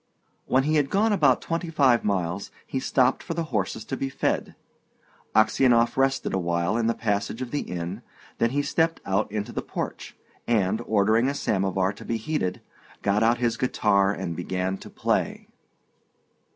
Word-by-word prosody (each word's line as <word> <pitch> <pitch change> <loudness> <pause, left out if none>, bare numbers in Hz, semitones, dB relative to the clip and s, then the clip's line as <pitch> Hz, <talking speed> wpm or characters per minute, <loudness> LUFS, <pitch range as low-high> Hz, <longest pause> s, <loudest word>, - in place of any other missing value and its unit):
When 130 +1 +3
he 155 +2 +2
had 145 -2 +1
gone 210 +2 +2
about 145 -10 +3
twenty 165 +1 -2
five 135 -7 +3
miles, 95 -1 -1 0.2
he 135 - -3
stopped 130 0 +2
for 165 - -5
the 170 - -1
horses 105 +1 -1
to 135 - -3
be 135 0 -3
fed. - - -1 0.8
Aksionov 120 +1 +4
rested 135 0 +1
awhile 85 +1 0
in 115 -1 +1
the 115 - +1
passage 105 +1 -1
of 130 -2 -5
the 145 - 0
inn, 90 +4 -5 0.4
then 115 - +3
he 145 +3 0
stepped 165 +2 +1
out 95 +2 0
into 105 -1 -3
the - - -3
porch, - - -6 0.3
and, 110 -3 +1
ordering 110 +3 +3
a 140 - -2
samovar 95 -5 0
to - - -12
be 115 - -2
heated, 110 -6 -2 0.4
got 100 +1 +2
out 115 +2 +4
his 120 -2 0
guitar 100 -6 +2
and 85 -4 -4
began 90 +2 -2
to - - -11
play. - - -1
115 Hz, 170 wpm, -25 LUFS, 100-135 Hz, 0.8 s, Aksionov